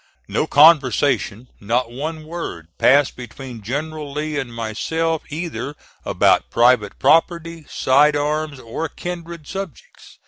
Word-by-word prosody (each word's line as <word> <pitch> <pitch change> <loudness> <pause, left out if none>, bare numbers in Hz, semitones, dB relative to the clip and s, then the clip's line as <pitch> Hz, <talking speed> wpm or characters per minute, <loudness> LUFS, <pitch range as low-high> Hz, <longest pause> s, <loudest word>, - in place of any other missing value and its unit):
No - - -1
conversation, 135 -6 +4
not 115 +3 -1
one 155 +5 -5
word, 155 - -6
passed 140 +1 +4
between 125 -1 -9
General 145 +6 -4
Lee 150 +1 -3
and 130 -4 -5
myself, 155 +9 -2
either 150 -2 -5 0.3
about - - +2
private 120 -3 +3
property, 165 -1 +2
side 145 +3 +3
arms, 150 0 -1
or 130 +7 -4
kindred 170 -2 -7
subjects. 195 - -9
145 Hz, 115 wpm, -20 LUFS, 125-160 Hz, 0.3 s, conversation